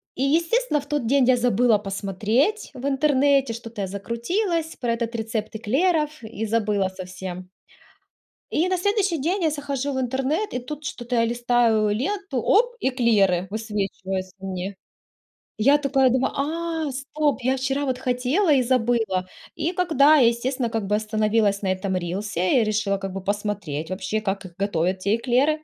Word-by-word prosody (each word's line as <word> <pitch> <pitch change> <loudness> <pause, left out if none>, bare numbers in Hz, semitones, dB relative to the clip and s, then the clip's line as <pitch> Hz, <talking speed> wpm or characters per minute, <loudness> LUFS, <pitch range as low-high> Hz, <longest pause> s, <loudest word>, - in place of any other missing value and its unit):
И, 260 - -1
естественно, 335 - +2
в - - -13
тот 290 -5 -1
день 270 0 +4
я 255 0 +5
забыла 240 -2 +3
посмотреть 215 - 0
в 260 +1 -7
интернете, 275 -2 +2
что-то 230 -2 -7
я 190 - -2
закрутилась 320 - -2
про 240 -2 -1
этот 235 0 -3
рецепт 220 -1 -3
эклеров 300 - 0
и 220 0 -5
забыла 210 -3 +1
совсем. 185 -1 -8 1.0
И 335 +4 +2
на 370 -1 +1
следующий 400 -3 +1
день 350 +6 0
я 315 - +3
захожу 280 -1 -3
в 260 - -1
интернет, 270 - -1
и 250 - -1
тут 295 +4 -7
что-то 245 -2 -4
я 230 0 +3
листаю 235 -2 +2
ленту, 335 - -2
оп, 485 +3 +3
эклеры 215 -9 +2
высвечиваются 195 -3 -3
мне. 190 0 -5 0.8
Я 275 +7 +5
такая 270 -2 +3
думаю, 260 +1 +1
а, 320 +1 -2
стоп, 280 +1 -1
я 260 +2 +1
вчера 270 +2 -1
вот 255 -1 -1
хотела 260 +8 +1
и 265 - +4
забыла. 230 -7 +1 0.3
И 325 +3 -1
когда 310 -4 +4
я, 245 -4 +6
естественно, 240 +1 0
как 225 -3 -2
бы 210 - +2
остановилась 215 -1 +1
на 190 - +1
этом 190 0 -2
рилсе 185 +4 0
и - - +3
решила 210 -2 0
как 195 -1 -5
бы 195 -1 -5
посмотреть 200 -7 -3
вообще, 190 +3 -2
как 195 -1 -3
их 175 -2 -11
готовят, 185 -2 0
те 200 +3 +1
эклеры. 270 +6 +1
240 Hz, 165 wpm, -24 LUFS, 205-285 Hz, 1.0 s, я